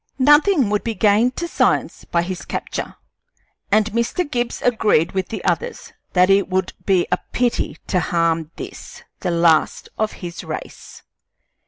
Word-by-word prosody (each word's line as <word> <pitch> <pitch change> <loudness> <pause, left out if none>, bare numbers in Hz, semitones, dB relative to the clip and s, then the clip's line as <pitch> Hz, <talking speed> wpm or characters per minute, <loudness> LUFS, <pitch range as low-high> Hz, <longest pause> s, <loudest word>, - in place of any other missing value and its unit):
Nothing 295 - +4
would 210 - 0
be 230 -2 -3
gained 220 +4 +3
to 340 - -3
science - - 0
by 170 0 0
his 185 0 -5
capture, - - -5 0.8
and 215 +1 +3
Mr. 235 - -1
Gibbs 240 -4 -2
agreed 210 -8 +2
with 190 -1 -2
the 220 - -6
others 485 +1 -2 0.2
that 180 0 +5
it 195 0 +3
would 185 0 -1
be 185 -3 +3
a - - +2
pity 245 -1 0
to 185 - +1
harm 165 -2 0
this, - - -9 0.2
the 185 - -2
last 170 -2 +2
of 215 0 0
his 175 -2 -7
race. - - -8
205 Hz, 155 wpm, -20 LUFS, 175-240 Hz, 0.8 s, that